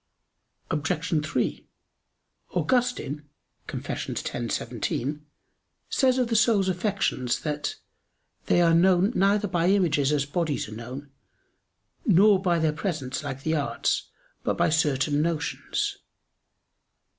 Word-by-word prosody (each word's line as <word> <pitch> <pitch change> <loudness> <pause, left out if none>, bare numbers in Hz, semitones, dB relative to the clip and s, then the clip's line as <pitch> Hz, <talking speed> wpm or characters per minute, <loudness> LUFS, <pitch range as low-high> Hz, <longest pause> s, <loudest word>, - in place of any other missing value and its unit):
Obj. 155 +1 0
3: 155 - -2 0.9
Augustine 240 - 0 0.4
(Confess. - - -4
x, - - -3
17) 150 +4 -3 0.7
says 260 -2 +3
of 250 -2 +2
the 230 - -1
soul's 215 -4 +4
affections 180 - 0
that 150 -1 -3 0.7
"they 175 - +4
are 165 -1 +4
known 185 +4 +4
neither 205 0 +2
by 175 -2 +1
images 165 -8 +3
as 145 -2 +1
bodies 155 -2 -1
are - - -10
known; 130 +5 -8 0.9
nor 200 - +5
by 175 -3 +2
their 160 -2 +1
presence, 155 -6 -3
like 135 +1 -5
the 160 0 +1
arts; 145 -3 -1 0.3
but - - -1
by - - +3
certain 145 -2 +2
notions." 165 -1 -2
165 Hz, 115 wpm, -26 LUFS, 145-195 Hz, 0.9 s, nor